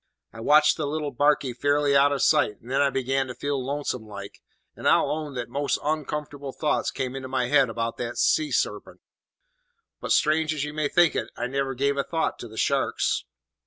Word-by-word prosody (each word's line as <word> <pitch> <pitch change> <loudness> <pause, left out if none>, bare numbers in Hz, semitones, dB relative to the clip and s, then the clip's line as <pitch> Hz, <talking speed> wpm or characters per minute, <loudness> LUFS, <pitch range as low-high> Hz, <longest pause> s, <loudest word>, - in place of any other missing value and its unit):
"I 115 - -10
watched 150 +6 +4
the 155 -3 -2
little 150 0 -3
barkie 145 -1 +2
fairly 145 +2 +1
out 140 +1 +5
of 140 - 0
sight, 105 - +3
and 120 - -12
then 135 +1 +2
I 140 - +4
began 135 0 -1
to 125 - -7
feel 140 +1 -2
lonesome 135 -4 -3
like, 100 -1 -9 0.3
and - - -3
I'll - - +3
own 150 -2 -4
that 120 -1 -3
most 140 +3 -1
oncomfortable 150 -2 -3
thoughts 150 +3 0
came 130 0 -4
into 130 -1 -5
my 130 -2 -1
head 135 -3 +4
about 115 0 -3
the 120 0 -4
sea 310 -1 +2
sarpent; - - -2 1.0
but, - - -5
strange 155 0 +2
as 145 - -2
you 150 0 -5
may 155 -1 0
think 170 +2 +3
it, - - -2
I - - -2
never 135 +1 -2
give 140 +2 0
a 140 - +1
thought 165 +2 -2
to 120 - -7
the 110 0 -13
sharks. 140 +3 0
140 Hz, 205 wpm, -25 LUFS, 125-150 Hz, 1.0 s, out